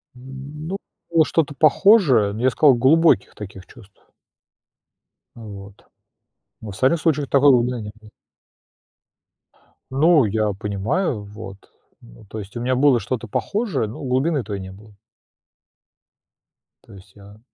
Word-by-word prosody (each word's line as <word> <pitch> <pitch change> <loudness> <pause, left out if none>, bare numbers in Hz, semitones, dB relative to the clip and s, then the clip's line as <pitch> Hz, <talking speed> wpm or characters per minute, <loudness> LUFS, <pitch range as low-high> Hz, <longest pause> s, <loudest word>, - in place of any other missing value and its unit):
Ну, 140 +7 -8 0.3
было 165 -2 +4
что-то 150 -3 -1
похожее, 150 - +4
ну, 110 - -7
я 130 - +3
сказал, 135 +2 +4
глубоких 135 - +3
таких 95 -3 -10
чувств. 100 0 -19 1.3
Вот. 100 -3 -12 0.8
В 110 - -8
остальных 130 - +1
случаях 150 -3 0
такой 140 +1 +4
глубины 125 -1 +1
не 105 0 -8
было. 110 -1 -17 1.8
Ну, 150 +1 +4
я 105 0 -1
понимаю, 105 - -2
вот. 100 -1 -10 0.4
Ну, - - -17
то 110 - -8
есть 100 -1 -10
у 120 - -4
меня 130 +1 0
было 135 -1 +3
что-то 120 0 -5
похожее, 200 - -2
но 115 - -9
глубины 135 +2 0
той 100 -1 -6
не 95 0 -9
было. 105 +2 -16 1.9
То - - -18
есть 95 0 -17
я 100 +1 -16
120 Hz, 130 wpm, -21 LUFS, 105-145 Hz, 1.9 s, было